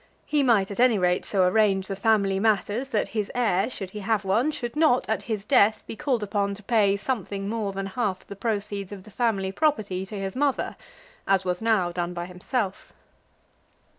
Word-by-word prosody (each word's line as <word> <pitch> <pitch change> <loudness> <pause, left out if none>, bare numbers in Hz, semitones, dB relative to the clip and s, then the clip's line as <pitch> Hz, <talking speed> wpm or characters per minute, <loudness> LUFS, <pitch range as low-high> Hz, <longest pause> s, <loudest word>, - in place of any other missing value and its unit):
He 300 -1 +1
might, 220 -7 +3
at 200 - -7
any 245 -3 +5
rate, 180 -1 +1
so 190 -3 +3
arrange 195 -1 +2
the 195 - -3
family 200 -2 +2
matters, 220 +4 +1
that 220 -5 0
his 215 -2 -2
heir, 220 -3 +2
should 195 -7 -6
he 210 - -6
have 210 0 0
one, 220 +10 +2
should 275 -5 -4
not 305 -5 +3
at 220 - 0
his 210 -3 -2
death 210 +1 +4
be - - -7
called 255 -4 -1
upon 200 -1 -1
to 205 - -13
pay 200 -3 +3
something 200 -3 -3
more 215 -2 -2
than 195 0 -4
half 195 -2 -2
the 200 - -9
proceeds 205 -2 -3
of 195 -2 -8
the 215 - -15
family 200 -5 0
property 210 -9 0
to 210 - -8
his 195 -1 -4
mother, 280 0 0 0.5
as 195 -1 +2
was 180 +1 -1
now 215 -6 +2
done 175 0 -3
by 175 0 -3
himself. 190 +3 -4
205 Hz, 195 wpm, -25 LUFS, 195-230 Hz, 0.5 s, any